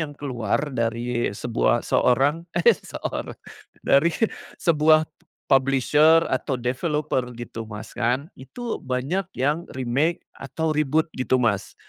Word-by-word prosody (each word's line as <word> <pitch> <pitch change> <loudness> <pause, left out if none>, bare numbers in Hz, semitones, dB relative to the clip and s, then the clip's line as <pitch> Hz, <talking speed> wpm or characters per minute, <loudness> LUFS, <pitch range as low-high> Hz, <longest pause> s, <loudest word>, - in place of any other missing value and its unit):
yang 155 -2 -3
keluar 135 +1 -2
dari 120 0 -1
sebuah 120 +1 0
seorang 145 +7 +2
eh 175 - +6
seorang. - - -5 0.5
Dari 140 +5 +4 0.5
sebuah 155 -1 +4 0.5
publisher 140 +4 +4
atau 130 +1 -1
developer 130 +2 -1
gitu 115 -1 -7
Mas 105 0 -8
kan, 125 +6 -1
itu 235 - -6
banyak 135 +9 -2
yang 150 +6 0
remake 135 +7 0
atau 155 +4 -3
reboot 155 +2 +1
gitu 130 0 0
Mas. 100 -4 0
135 Hz, 115 wpm, -24 LUFS, 125-155 Hz, 0.5 s, eh